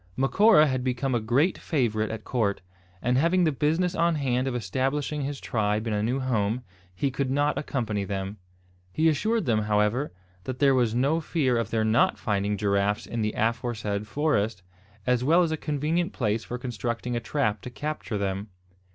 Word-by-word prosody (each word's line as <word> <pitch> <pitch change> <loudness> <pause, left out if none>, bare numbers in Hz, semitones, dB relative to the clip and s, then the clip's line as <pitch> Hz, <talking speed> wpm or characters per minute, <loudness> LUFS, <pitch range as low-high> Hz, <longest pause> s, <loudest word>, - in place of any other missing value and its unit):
Macora 155 - +5
had 130 -3 -1
become 130 +1 -1
a 120 - +2
great 125 - +1
favourite 110 -8 0
at 110 -1 -5
court; 105 -7 -1 0.4
and, 125 +1 +2
having 175 +4 +3
the 160 - +3
business 160 +6 +1
on 170 -2 +2
hand 130 -3 0
of 130 - -2
establishing 135 +7 -1
his 140 0 -3
tribe 105 -2 -1
in 115 - -1
a 105 - 0
new 120 +5 0
home, 120 -2 0 0.3
he 135 +8 0
could 135 0 -2
not 145 +2 +1
accompany 115 -8 -2
them. 95 +1 -4 0.5
He 160 - +2
assured 215 +7 +1
them, 115 -3 +2
however 105 +6 +1 0.3
that 130 -1 -4
there 135 0 +4
was 120 -3 +2
no 140 +7 +2
fear 145 -6 +1
of 115 -2 -1
their 110 -1 +1
not 110 +3 +3
finding 105 -1 -1
giraffes 100 +1 +1
in 115 - -3
the 105 0 -1
aforesaid 110 -2 -1
forest, 110 - 0 0.4
as 125 0 +2
well 165 +6 +5
as 165 - 0
a - - +1
convenient 155 +4 -1
place 110 -2 -1
for 125 - -5
constructing 120 -1 -3
a - - 0
trap 115 -4 -1
to - - -7
capture 145 -4 -4
them. 100 +1 -2
125 Hz, 185 wpm, -26 LUFS, 110-145 Hz, 0.5 s, Macora